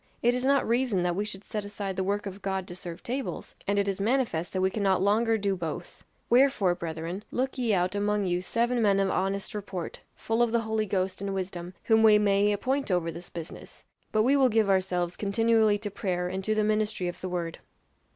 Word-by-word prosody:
'It 240 +1 +4
is 250 0 -1
not 275 +1 +3
reason 235 -5 +1
that 175 -1 0
we 200 - 0
should 205 -2 -6
set 210 0 -4
aside 200 -1 -4
the 190 - -1
work 205 +2 -1
of 195 0 -7
God 190 -1 -2
to 175 - -8
serve 175 -1 -8
tables' 260 +3 -4
and 200 +1 +1
it 200 0 +2
is 195 0 -2
manifest 220 -8 0
that 190 - -2
we 190 0 +2
cannot 195 -3 +1
longer 220 +4 +3
do 200 -2 0
both 165 -4 -6 0.2
'wherefore, 240 -7 +4
brethren, 170 +3 -5
look 260 +1 -2
ye 240 -3 +1
out 185 -1 +1
among 205 0 0
you 180 -1 0
seven 235 +5 0
men 200 -2 +3
of 195 -1 +2
honest 195 +2 -1
report, 195 -4 -5 0.2
full 225 +1 -1
of 240 -1 +3
the 235 0 +2
Holy 220 -1 -1
Ghost 185 -1 -1
and 200 -1 -2
wisdom, 180 -1 -5
whom 220 -1 +4
we 215 -1 +7
may 205 0 +3
appoint 260 +7 -1
over 175 -3 +1
this 170 +2 -9
business. 165 -1 -9 0.3
But 215 0 +3
we 265 +4 +4
will 265 -2 +5
give 220 -3 +3
ourselves 180 -2 0
continually 220 0 +3
to 205 0 -5
prayer 180 -2 -2
and 190 +1 -4
to 215 - +1
the 215 - +2
ministry 215 -3 0
of 175 - -6
the 185 - -3
word. 170 -2 -3
200 Hz, 220 wpm, -28 LUFS, 185-220 Hz, 0.3 s, we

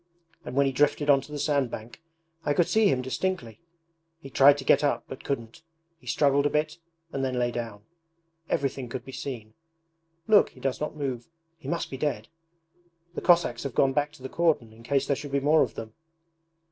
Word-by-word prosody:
And 125 - -7
when 140 0 +4
he 135 - +1
drifted 145 +2 +2
onto 140 +1 +1
the 150 - -4
sand 140 -3 +1
bank 115 +7 -9 0.4
I 145 - 0
could 175 - +3
see 220 -1 +4
him 130 -2 +1
distinctly: 165 -1 -3 0.6
he 135 -4 -11
tried 140 +2 +6
to 140 - -6
get 135 - +4
up 145 - +1
but 130 - -9
couldn't. 115 -3 -4 0.4
He - - -20
struggled 140 0 +3
a - - -1
bit 155 +2 -1 0.3
and 135 - -2
then 130 -1 -1
lay 120 0 +1
down. 115 -4 -6 0.7
Everything 135 -2 -1
could 130 +2 -6
be 135 - -9
seen. 120 -5 -6 0.7
Look, 210 -2 +6
he - - -18
does 135 0 -2
not 150 - -3
move 130 -5 -3 0.3
he 165 - -12
must 170 0 -2
be 135 - -5
dead! 145 +1 -2 0.8
The - - -4
Cossacks 175 -1 +3
have 140 -3 -5
gone 135 -1 +3
back 145 +1 0
to 135 - -16
the - - -3
cordon 150 -8 0
in 115 - -16
case 135 +3 0
there 140 - +1
should 145 0 -8
be - - +3
any 140 - -2
more 155 +1 +5
of - - 0
them.' 110 -1 -7
140 Hz, 210 wpm, -27 LUFS, 125-150 Hz, 0.8 s, tried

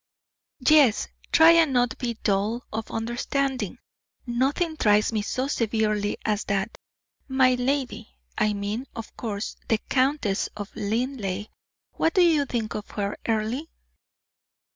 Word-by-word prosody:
"Yes! 290 -8 +5 0.2
try 320 +1 +8
and 330 -4 +4
not 245 -2 +2
be 240 -2 -2
dull 210 +4 0
of 220 0 -4
understanding 250 +4 -2 0.5
nothing 275 +7 0
tries 210 -4 +3
me 215 - +1
so 255 +5 -2
severely 215 -5 0
as 215 -1 0
that. 200 +2 -1 0.5
My 260 -1 +4
lady! 250 - -2 0.2
I 215 - +1
mean, 205 +6 -3
of 230 -1 -8
course, 210 -3 -4
the 225 - +3
Countess 260 -7 +1
of 205 -1 -7
Linleigh. 210 -2 -2 0.4
What 325 - 0
do 370 - +6
you 315 -4 +4
think 225 -4 -2
of 210 - -6
her, 205 -1 -3
Earle?" 225 +6 -1
235 Hz, 130 wpm, -25 LUFS, 210-265 Hz, 0.5 s, try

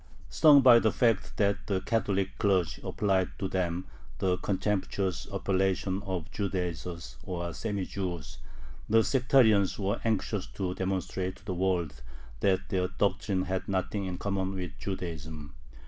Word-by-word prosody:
Stung 150 -3 +7
by 125 -3 +8
the 110 -2 +2
fact 115 -4 +1
that 100 -1 +1
the 95 -2 +1
Catholic 100 -2 -1
clergy 90 -7 +1
applied 95 -3 0
to 95 - -2
them 90 -1 -1 0.3
the 90 -1 +1
contemptuous 95 -2 -1
appellation 95 0 0
of 90 -2 -3
"Judaizers," 85 - -4
or 85 +1 -4
semi 100 -2 -2
Jews, 85 -5 -5 0.5
the 115 +1 +5
sectarians 110 -4 +4
were 100 +2 -1
anxious 105 -3 -1
to 95 -2 -2
demonstrate 95 0 -2
to 100 - -20
the 95 - -2
world 90 -4 -1 0.4
that 95 +3 +1
their 90 -1 +1
doctrine 95 0 0
had 95 0 -3
nothing 100 +1 -1
in 90 -1 -4
common 95 0 -2
with 90 -4 -4
Judaism. 80 -6 -5
95 Hz, 140 wpm, -29 LUFS, 90-100 Hz, 0.5 s, by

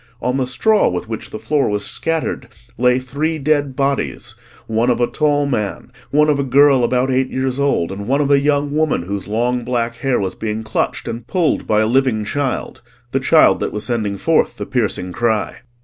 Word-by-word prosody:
On 125 +1 -1
the 130 -2 -1
straw, 215 - +2
with 90 +3 -4
which 110 -1 -6
the - - -6
floor 135 +6 0
was 105 0 -2
scattered, 160 -6 -2 0.3
lay 125 +1 +3
three 140 +5 -2
dead 145 -2 0
bodies, 135 -4 -2 0.3
one 115 +2 0
of 120 -1 +1
a 120 - +3
tall 145 +1 +1
man, 120 -3 -3 0.2
one 150 +1 +3
of 145 -2 +2
a - - +1
girl 135 0 +4
about 125 +2 +1
eight 130 0 +1
years 130 0 -2
old, 140 -12 +1
and 100 +1 -6
one 135 +3 +2
of 145 -1 +1
a 140 - +6
young 145 0 +1
woman 155 - +1
whose 100 +1 -5
long 120 +3 0
black 115 -1 -2
hair 135 -2 0
was 95 -2 -2
being 110 0 -4
clutched 110 0 -2
and 115 0 -6
pulled 175 -5 0
by 105 0 +3
a - - +2
living 125 -3 +1
child—the 140 +3 -4
child - - +4
that - - -2
was 105 - -4
sending 110 -5 -2
forth - - +1
the - - -4
piercing 90 0 -1
cry. 110 +2 -1
125 Hz, 200 wpm, -18 LUFS, 110-140 Hz, 0.3 s, a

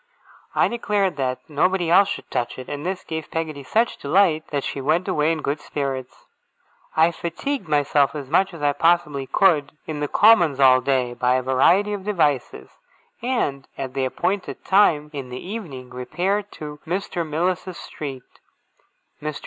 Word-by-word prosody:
I - - +4
declared 205 -6 0
that 130 -2 -2
nobody 170 +3 +1
else 200 +3 +6
should - - -6
touch 120 - -2
it; 130 - -8
and 145 0 -5
this 185 +2 -3
gave 160 -1 -5
Peggotty 160 -3 -3
such 225 - +1
delight 160 +1 +2
that 140 -2 -2
she 140 - -4
went 165 +7 +1
away 150 +2 +2
in 160 -2 -3
good 145 +2 -1
spirits. 135 -3 -5 0.7
I 165 +2 +5
fatigued 175 - -4
myself 145 -1 +2
as 145 -3 -5
much 190 +7 +2
as 165 -4 -9
I 145 0 +3
possibly 150 -5 +1
could 150 -1 +3
in 155 -2 -5
the 145 - -1
Commons 175 -8 +5
all 130 -1 +6
day, 125 -2 0
by 125 +1 +1
a 130 - 0
variety 175 +11 +3
of 200 -2 -5
devices, 150 -10 0 0.5
and 225 - -1
at 130 -1 -5
the 135 -1 0
appointed 185 +9 -2
time 155 -7 +3
in 135 -3 -6
the 125 - -6
evening 165 - -7
repaired 190 +11 -2
to 150 -1 -8
Mr. 180 0 -2
Mills's 175 +3 -2
street. 135 -4 -7 1.0
Mr. 150 -1 -4
155 Hz, 165 wpm, -23 LUFS, 140-185 Hz, 1.0 s, else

